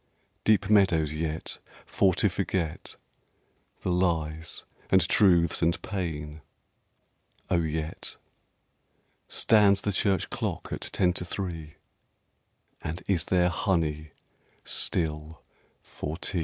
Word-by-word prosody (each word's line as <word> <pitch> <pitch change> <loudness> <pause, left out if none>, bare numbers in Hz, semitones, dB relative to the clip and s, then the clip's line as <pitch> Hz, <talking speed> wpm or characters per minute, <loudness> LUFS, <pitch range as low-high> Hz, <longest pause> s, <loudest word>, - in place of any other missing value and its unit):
Deep 105 -2 +3
meadows 90 -8 +3
yet, 80 0 -3 0.3
for 95 -2 +3
to - - +3
forget 90 -4 -2 0.9
The 90 - -1
lies, 80 -3 0 0.3
and 95 -2 +4
truths, 85 -6 +4
and 85 0 +2
pain?... 80 -6 -4 1.1
oh! 85 - +3
yet 80 0 -4 1.1
Stands 100 -3 +4
the 105 - 0
Church 95 0 +1
clock - - -4
at - - -4
ten 90 -1 +1
to 90 - -2
three? 85 -4 -5 1.1
And 80 +3 -5
is 85 -4 +1
there 90 -1 +3
honey 80 -6 -1 0.5
still 80 -1 0 0.4
for 75 +2 -6
tea? 90 - -1
85 Hz, 105 wpm, -27 LUFS, 80-95 Hz, 1.1 s, and